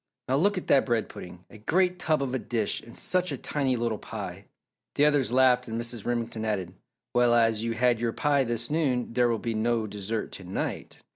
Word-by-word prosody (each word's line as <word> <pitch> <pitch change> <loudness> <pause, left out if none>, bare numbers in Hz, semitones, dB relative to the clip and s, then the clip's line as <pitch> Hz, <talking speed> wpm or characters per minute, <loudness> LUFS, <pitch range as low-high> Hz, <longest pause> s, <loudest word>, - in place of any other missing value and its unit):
Now, 130 - +2
look 200 +6 +2
at 185 - -3
that 135 - +4
bread 120 -3 0
pudding 90 0 -10
a 110 - -12
great 180 - +1
tub 155 -5 +1
of 130 -2 -3
a 130 - 0
dish, 115 -4 -2
and 115 - -12
such 180 0 0
a - - -2
tiny 135 -3 0
little 115 -3 -1
pie!" - - -7 0.5
The 145 - +4
others 145 -5 +3
laughed 125 -1 +4
and 115 0 -3
Mrs. 115 -2 -4
Remington 115 -2 -2
added, 95 -5 -2 0.4
"Well, 120 -1 +4
as 115 -2 +3
you 115 0 -1
had 120 0 +2
your 115 0 0
pie 145 +1 +2
this 120 0 -2
noon, 130 -7 0
there 120 0 +3
will 115 - +1
be 115 +1 -3
no 115 +1 +1
dessert 105 +1 -4
to 95 - -8
night!" 90 +1 -5
120 Hz, 215 wpm, -27 LUFS, 110-135 Hz, 0.5 s, that